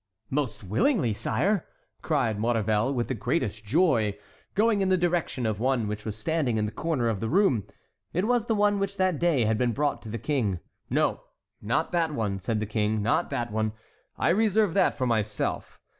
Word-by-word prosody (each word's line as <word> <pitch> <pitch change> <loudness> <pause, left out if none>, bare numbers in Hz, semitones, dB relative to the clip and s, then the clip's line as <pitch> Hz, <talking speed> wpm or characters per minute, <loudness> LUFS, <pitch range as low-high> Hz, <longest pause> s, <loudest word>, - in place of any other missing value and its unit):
"Most 130 -6 -2
willingly, 120 - +1
sire!" 195 - 0 0.3
cried 125 -9 0
Maurevel, 110 +1 +1
with 120 -3 -1
the - - -1
greatest 120 - -2
joy, 115 - +2 0.4
going 215 -1 +3
in 190 - +1
the 185 - +4
direction 175 -7 0
of 110 -2 -1
one 125 -2 +1
which 105 0 -5
was 110 -1 -4
standing 130 0 0
in 105 0 0
a - - -5
corner 150 -6 -1
of 110 -4 0
the 115 - -2
room. 160 - +3 0.5
It 180 +4 0
was 240 0 +1
the 225 - +2
one 205 -1 +2
which 195 0 -2
that 185 -5 +1
day 160 -9 +2
had 110 0 +1
been 125 -2 +1
brought 145 +2 0
to 110 - -9
the 115 - -3
King. 110 - -1 0.3
"No, - - +1 0.4
not 120 +9 0
that 170 -3 +1
one," 100 -4 -1
said 105 +3 -1
the 110 - -1
King, 105 0 0
"not 115 - +1
that 120 -4 -2
one; 110 0 -1 0.4
I - - +1
reserve 210 0 +3
that 195 - +3
for 130 - -1
myself. 110 -3 -2
125 Hz, 195 wpm, -27 LUFS, 110-175 Hz, 0.5 s, the